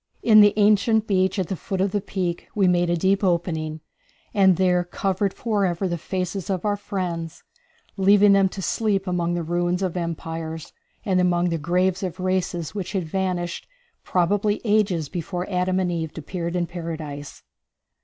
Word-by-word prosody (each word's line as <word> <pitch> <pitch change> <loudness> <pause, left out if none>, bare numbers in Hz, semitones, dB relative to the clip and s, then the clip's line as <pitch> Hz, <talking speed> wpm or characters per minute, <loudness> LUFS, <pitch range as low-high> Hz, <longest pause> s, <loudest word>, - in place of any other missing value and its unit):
In 215 -2 +7
the 205 -1 +5
ancient 215 +1 +4
beach 190 -1 +1
at 185 -3 -1
the 190 - -2
foot 190 +2 -4
of 195 0 +1
the 205 - 0
peak 185 -3 -3
we 195 -3 +3
made 175 -1 +2
a 175 - +1
deep 195 +4 +1
opening, 160 -4 -1 0.5
and 190 -3 +4
there 180 -1 +3
covered 190 +2 -1
forever 195 -5 -1
the 175 - -1
faces 185 +2 -3
of 190 0 -2
our 205 -1 +2
friends, 180 -5 -4 0.5
leaving 200 +1 +5
them 195 -1 +4
to 190 0 -7
sleep 200 -3 0
among 175 -2 -1
the 175 - -2
ruins 175 +2 0
of 185 -2 -2
empires, 165 -2 -5 0.3
and 185 -2 +2
among 175 -1 +2
the 165 -1 -1
graves 180 +4 +1
of 185 -1 -4
races 185 -3 -1
which 200 -2 -5
had 190 -3 0
vanished 175 0 -3 0.4
probably 205 +4 +1
ages 205 -7 +2
before 180 +2 -4
Adam 185 +1 +1
and 180 -2 0
Eve 160 -2 -4
appeared 170 +2 -4
in 175 -1 +1
Paradise. 160 -4 -7
180 Hz, 170 wpm, -23 LUFS, 170-195 Hz, 0.5 s, In